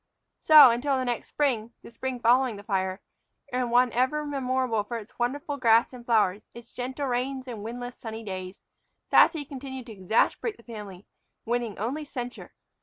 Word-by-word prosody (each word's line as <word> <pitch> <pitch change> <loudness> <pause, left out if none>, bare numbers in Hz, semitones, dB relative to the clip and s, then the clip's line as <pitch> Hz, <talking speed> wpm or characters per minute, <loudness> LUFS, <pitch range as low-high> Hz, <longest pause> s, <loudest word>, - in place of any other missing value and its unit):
So, 300 -5 +9
until 265 +4 0
the 255 - -1
next 240 -1 -2
spring, 235 -6 -1
the - - -12
spring 255 +2 -4
following 245 0 +3
the 200 - -10
fire, 190 -1 -2 0.5
and 250 -1 0
one 245 +1 +4
ever 260 +5 0
memorable 255 -5 -1
for 235 +3 -5
its 220 +1 -12
wonderful 285 +4 -2
grass 230 -1 +4
and 245 -1 -10
flowers, 215 -4 +1
its 235 0 -12
gentle 260 +3 -4
rains 260 +1 -2
and 225 -5 -6
windless, 245 +2 -6
sunny 225 0 -7
days, 185 -2 -7 0.4
Sassy 310 -4 +4
continued 265 -2 -7
to 235 - -10
exasperate 215 - 0
the 235 - -18
family, 205 -5 -9 0.4
winning 235 -2 -2
only 260 +9 -3
censure. 245 -4 -7
245 Hz, 170 wpm, -27 LUFS, 225-260 Hz, 0.5 s, So